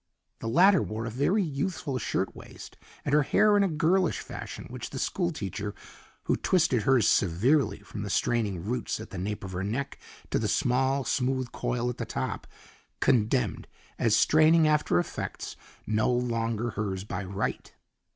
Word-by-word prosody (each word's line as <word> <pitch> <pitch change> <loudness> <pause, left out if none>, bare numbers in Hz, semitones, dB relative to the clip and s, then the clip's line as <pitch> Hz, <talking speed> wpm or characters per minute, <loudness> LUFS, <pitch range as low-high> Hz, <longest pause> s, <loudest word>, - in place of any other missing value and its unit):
The 115 - -4
latter 185 - +5
wore 110 +1 -4
a 115 - -4
very 160 - +2
youthful 145 -3 -2
shirt - - -2
waist, - - -11 0.3
and 140 - -1
her 150 - +6
hair 210 +9 +4
in 205 - +4
a 200 - +3
girlish 170 +2 +2
fashion - - -7
which - - -6
the - - -7
school 85 - -1
teacher, 100 +1 -5 0.5
who - - +1
twisted 165 -10 +2
hers 125 -2 +3
severely 115 - +2
from - - -8
the - - -4
straining 105 -8 0
roots 120 +1 -2
at 110 0 -9
the 95 - -5
nape 105 +3 -4
of 95 - -6
her 90 +1 -3
neck 130 +8 -3 0.3
to - - +2
the - - 0
small, 130 +2 +1
smooth 130 0 -1
coil 120 0 -2
at 125 - -3
the - - -2
top, - - -4 0.5
condemned 115 -1 +1 0.3
as 110 -2 +3
straining 155 +5 +5
after 150 - +2
effects 85 - -4 0.3
no 110 +2 +1
longer 120 -1 -1
hers 95 -3 -3
by 100 -1 -4
right. 95 +2 -3
125 Hz, 170 wpm, -28 LUFS, 105-150 Hz, 0.5 s, her